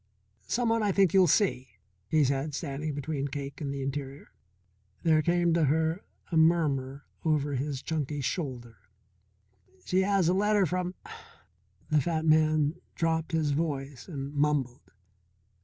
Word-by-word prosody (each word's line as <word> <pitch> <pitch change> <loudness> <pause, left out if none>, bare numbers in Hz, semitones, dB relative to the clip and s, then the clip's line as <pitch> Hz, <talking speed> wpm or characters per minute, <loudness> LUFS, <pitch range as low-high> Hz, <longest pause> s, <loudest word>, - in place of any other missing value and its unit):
"Someone 230 -1 +1
I 205 -1 +2
think 190 -3 +3
you'll 190 -2 +6
see," 130 - +1 0.3
he 155 +7 +3
said, 140 +2 -1
standing 145 -1 -4
between 145 -1 -3
Cake 140 +2 -6
and 140 -2 -3
the 140 -1 -4
interior. 135 +1 -5 0.7
There 160 -2 +4
came 175 +1 +2
to 165 -2 +3
her 160 +5 0 0.3
a 165 - +1
murmur 145 -5 +2 0.2
over 150 -3 +1
his 135 0 -3
chunky 150 -2 -2
shoulder. 125 -4 -4 1.1
"She 185 - +2
has 195 -3 +2
a 180 - +3
letter 205 +1 +3
from 180 +1 -2 0.5
" - - -38
The 150 -1 +4
fat 160 +2 -1
man 155 -1 +3
dropped 165 0 0
his 160 -3 +1
voice 140 -3 -3
and 140 -4 -6
mumbled. 145 -4 -1
155 Hz, 140 wpm, -28 LUFS, 140-170 Hz, 1.1 s, you'll